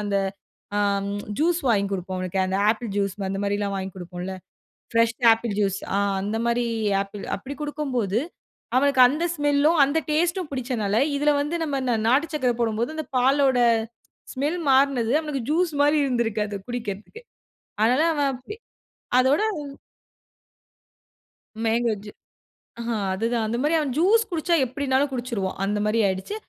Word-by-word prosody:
அந்த 200 -1 0 1.2
ஜூஸ் 340 +2 +2
வாங்கி 200 -4 +2
கொடுப்போம் 185 -1 -3
அவனுக்கு 185 +1 -2
அந்த 190 +1 -1
ஆப்பிள் 225 0 -3
ஜூஸ் 200 -1 -1
அந்த 195 - -3
மாரிலா 205 0 -1
வாங்கி 190 0 -4
குடுப்போம்ல, 180 +1 -6 0.6
ஃப்ரஷா 230 +1 +2
ஆப்பிள் 225 -2 -4
ஜூஸ். 195 -2 +1 0.2
ஆ - - +2 0.2
அந்த 210 +3 -2
மாரி 235 0 +1 0.4
ஆப்பிள், 200 0 -9
அப்டி 265 +7 -8
குடுக்கும்போது 255 -8 -1 0.6
அவனுக்கு 275 0 +3
அந்த 300 +6 -1
ஸ்மெலும், 290 +2 +3
அந்த 285 +4 0
டேஸ்டும் 345 +2 0
பிடிச்சனால 235 -6 -1 0.2
இதுல 295 +1 +2
வந்து 295 +3 -2
நம்ம 290 -4 -1
இந்த 250 -2 +1
ந - - -3
நாட்டு 275 +7 +3
சர்க்கர 255 -5 +1
போடும்போது, 225 +2 -1
அந்த 315 - -4
பாலோட 265 0 +3 0.8
ஸ்மெல் 295 +7 -1
மாறுனது 265 -3 +3
அவனுக்கு 300 -5 -4
ஜூஸ் 335 +1 +1
மாரி 295 +1 +4
இருந்துருக்குது 220 -5 -1
குடிக்கறதுக்கே. 235 - -6 0.6
அதனால 255 +8 +3
அவன் 290 -2 +1
அப்டி 260 - -9 0.6
அதோட 265 +6 +3 2.2
மேங்கோ 230 0 +1
ஜூ, 210 - -8 0.7
ஆஹ 235 - -3 0.2
அதுதான். 225 +3 -1
அந்த 230 +2 -2
மாரி. 300 +2 +2
அவன் 285 -4 -2
ஜூஸ் 410 +8 +4
குடிச்சா 340 0 +1
எப்டினாலும் 270 +2 0
குடிச்சுடுவான் 235 -7 -3
அந்த 205 +1 -1
மாரி 215 +2 +1
ஆய்டுச்சு. 190 - -3
245 Hz, 140 wpm, -24 LUFS, 210-290 Hz, 2.2 s, மாரி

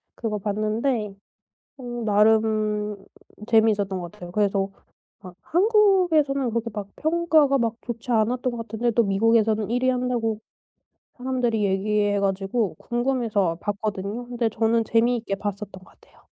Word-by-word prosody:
그거 215 -3 -3
봤는데 215 +2 -1 0.7
음 240 -2 -5
나름 215 0 +2 0.5
재미있었던 210 -4 +2
것 175 -1 -7
같아요. 175 -1 -10
그래서 200 -1 +1 0.5
아 185 -3 -11
한국에서는 355 - +3
그렇게 230 0 -2
막 205 -2 -6
평가가 315 -3 +3
막 230 -2 0
좋지 240 +1 -6
않았던 245 +3 +1
것 - - -5
같은데 230 +1 -2
또 235 - +3
미국에서는 220 +1 +2
1 245 +1 0
위 255 - +4
한다고 245 -4 -1 0.8
사람들이 245 -4 -1
얘기해 205 +1 +1
가지고 195 +1 -1
궁금해서 235 -8 0
봤거든요. 205 +2 -4
근데 240 -2 -1
저는 225 +1 +1
재미있게 230 -2 +1
봤었던 205 0 -5
것 185 -1 -12
같아요. - - -24
225 Hz, 315 characters per minute, -24 LUFS, 205-245 Hz, 0.8 s, 위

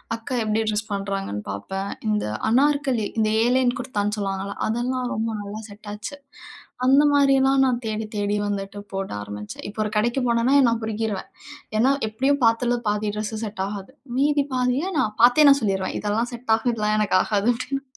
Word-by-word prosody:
அக்கா 230 +3 -5
எப்படி 215 +1 0
ட்ரெஸ் 215 +1 -1
பண்ணுறாங்கன்னு 195 - -3
பார்ப்பேன். 195 - -4 0.2
இந்த 210 0 0 0.2
அனார்கலி 270 -3 +2
இந்த 215 -1 +2 0.2
ஏலன் 250 0 +2
குர்தான்னு 210 -4 -2
சொல்லுவாங்கல்ல, 195 0 -3
அதெல்லாம் 245 +2 -1
ரொம்ப 225 +1 -1
நல்லா 205 +2 -6
செட்டாச்சு. 210 +5 -8 0.7
அந்தமாரியெல்லாம் 275 -1 +4
நான் 250 -1 0
தேடி, 220 0 -2
தேடி, 205 0 0
வந்துட்டு 200 0 -4
போட 195 0 -3
ஆரம்பிச்சேன். 105 +1 -8
இப்போ 215 +1 -4
ஒரு 210 - -3
கடைக்கு 240 +5 +1
போனேன்னா 235 +3 +2 0.2
நான் 230 0 -1
பொரிக்கிறுவேன். 220 +1 -3 0.5
ஏன்னா 260 +4 +4 0.2
எப்படியும் 270 +6 +1
பாத்தல 240 +2 +2
பாதி 210 0 0
ட்ரெஸ்ஸு 215 +1 -3
செட் 205 -2 -4
ஆகாது. 205 +4 -7 0.2
மீதி 285 +1 +2
பாதிய 255 +9 0
நான் 215 -4 0
பார்த்தே 270 +5 +7
நான் 275 0 +5
சொல்லிடுவேன், 190 -2 -1
இதெல்லாம் 220 +4 -1
செட் 235 -1 -2
ஆகும், 240 +2 -1
இதெல்லாம் 215 -1 0
எனக்கு 200 -3 +3
ஆகாது 210 +1 0
அப்படின்னு. 275 +3 -4
220 Hz, 160 wpm, -23 LUFS, 205-255 Hz, 0.7 s, பார்த்தே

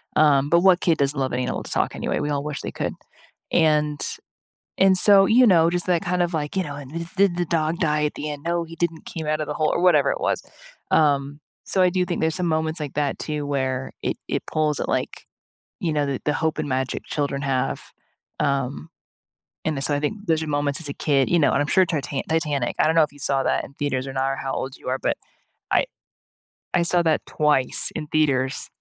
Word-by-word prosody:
um, 145 -2 +4
but 170 +2 +4
what 185 -1 +5
kid 165 -3 +2
doesn't 140 0 0
love 130 -1 -1
an 125 - 0
animal 125 - -2
to - - -9
talk, - - 0
anyway? - - -2
We 145 - -2
all 140 0 -1
wish 150 -1 -4
they - - -5
could, - - -3 0.6
and 150 -2 +2
s - - -3 0.6
And 190 0 +5
so, 200 -1 +8
you 245 +3 +5
know, 170 -5 +5
just 175 0 -1
that 175 -2 +1
kind 180 0 0
of 175 -1 -1
like, 150 +1 -3
"You 190 - +2
know, 145 -2 -6
and, 140 -2 -9
th 170 - -4
th 170 - -10
the 200 +1 +5
did 175 - -7
the 175 - 0
dog 160 +1 0
die, 150 -3 +1
at - - -3
the 150 - -5
end." 145 -1 -7
no, 170 0 0
he 165 0 -11
didn't 165 -1 -2
came 160 -2 -6
out 155 0 0
of 155 - -2
the 150 - -3
hole 155 -1 +1
or, - - 0
whatever 155 -6 +4
it - - -5
was. - - 0 0.5
Um, 145 -1 +2 0.2
so, 190 - 0
I 180 - +5
Do 180 0 +1
think 175 - -3
there's 160 0 +1
some 180 -1 -1
moments 160 0 0
like 145 -3 -4
that 145 -1 -1
too, 150 -2 -3
where 130 -2 -2
it - - -1
it - - -1
pulls 155 -2 +1
at, - - -3
like, - - -2 0.6
you 165 - 0
know, 145 -1 +1
the 135 -2 -3
the 150 - +1
hope 160 +1 -1
and 150 - -3
magic 130 0 -2
children 140 -2 -2
have? 130 -2 -1 0.6
Um, 140 +1 -1 0.8
and 155 -2 -1
the 135 - -3
so, 145 - +3
I - - 0
think 205 +7 -3
those 160 -1 +2
are - - -5
moments 145 +1 0
as 145 - -4
a 140 - -3
kid, 140 -3 +1
you 175 - +3
know, 145 - +3
and - - +2
I'm 145 - -1
sure 185 +4 +4
Tita 145 -5 -3
Titanic 150 -6 -1
I - - +4
don't 160 - +1
know 160 - +6
if 150 - -4
you 145 - -16
saw 135 -1 +1
that - - 0
in 140 - -14
theaters 135 -2 -2
or 135 - -6
not, 135 0 0
or - - -5
how 135 0 -4
old 130 0 -4
you - - -7
are, 130 - 0
but - - 0 0.6
I - - +3 0.9
I 175 - +3
saw 175 +1 +2
that 160 -2 +2
twice 150 -4 +1
in - - -4
theaters. 140 -3 0
150 Hz, 250 wpm, -23 LUFS, 140-165 Hz, 0.9 s, so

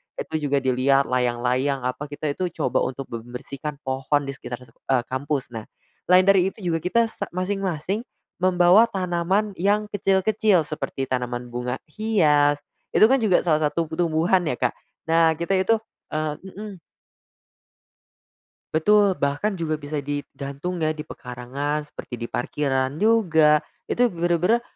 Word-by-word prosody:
Itu - - -3
juga 140 -1 +1
dilihat, 130 +2 +3
layang-layang 125 +2 0
apa 130 +4 -3
kita 145 0 -3
itu 180 +5 -2 0.2
coba 125 - +2
untuk 135 +1 -5
membersihkan 125 +5 -6
pohon 135 +2 0
di 140 - -4
sekitar, 125 -2 -8
eee, 125 +1 -2
kampus. 135 -1 -2
Nah, 110 -2 -7 0.4
lain 180 +1 +6
dari 195 -1 +5
itu 210 - -12
juga 165 - 0
kita 210 +8 +2
sa 200 - -5
masing-masing 190 0 -1 0.4
membawa 185 +4 +5
tanaman 190 +1 0
yang 205 +3 +2
kecil-kecil 195 -1 +2
seperti 150 -3 -4
tanaman 125 -2 -3
bunga 125 +1 -2 0.2
hias, 150 -9 +3 0.3
itu, - - +4
kan, 265 +3 +3
juga 210 -6 +3
salah 155 -3 +2
satu 170 - 0
tumbuhan, 175 +2 +2
ya, 125 - 0
Kak, 125 -1 0 0.4
Nah, 165 0 +5
kita 170 +3 0
itu, 190 +5 +3 0.4
eee 155 -1 -1
mhm. 195 0 -9 1.9
Betul. 200 +3 +4
Bahkan 145 +9 -1
juga 155 -3 -2
bisa 145 +1 -4
digantung, 145 +3 -4
ya, 155 -1 0
di 155 - -6
pekarangan 140 +2 -4
seperti 120 -4 -8
di 115 - -3
parkiran 135 0 -1
juga, 160 -9 +4 0.2
itu 245 - +3
bener-bener 175 +7 +2
155 Hz, 140 wpm, -24 LUFS, 135-185 Hz, 1.9 s, lain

